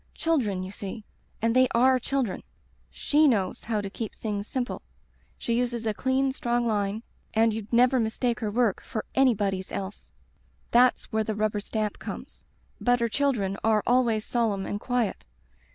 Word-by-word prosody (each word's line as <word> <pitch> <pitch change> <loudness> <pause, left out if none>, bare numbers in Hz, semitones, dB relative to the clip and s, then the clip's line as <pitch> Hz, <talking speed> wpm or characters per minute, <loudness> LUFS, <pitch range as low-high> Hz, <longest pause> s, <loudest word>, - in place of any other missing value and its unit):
Children, 230 - 0
you 185 - -6
see;*and 215 +3 -5
they 255 0 +6
are 255 +2 +5
children. 260 -5 -1 0.5
She 300 +1 +3
knows 200 -8 0
how 215 -2 0
to 200 - -5
keep 220 0 -5
things 205 -2 -3
simple. 255 -2 -3 0.6
She 235 - -2
uses 240 -1 -1
a 215 - +1
clean 265 +4 +1
strong 240 -2 0
line, 210 0 -1 0.3
and 225 0 +4
you'd 215 -1 -6
never 250 +2 +4
mistake 235 +2 0
her 215 - -2
work 225 -2 +1
for 220 - -5
anybody's 205 -8 +2
else. 195 +1 -6 0.6
That's 250 +1 +5
where 220 -1 +1
the 215 -1 -1
stamp 215 -1 -2
comes. - - -8 0.4
But 245 0 +3
her 235 0 +1
children 225 -8 0
are 220 -2 +3
always 235 -3 +2
solemn 215 -5 0
and 205 - -3
quiet. 245 -3 -1
225 Hz, 155 wpm, -27 LUFS, 210-245 Hz, 0.6 s, they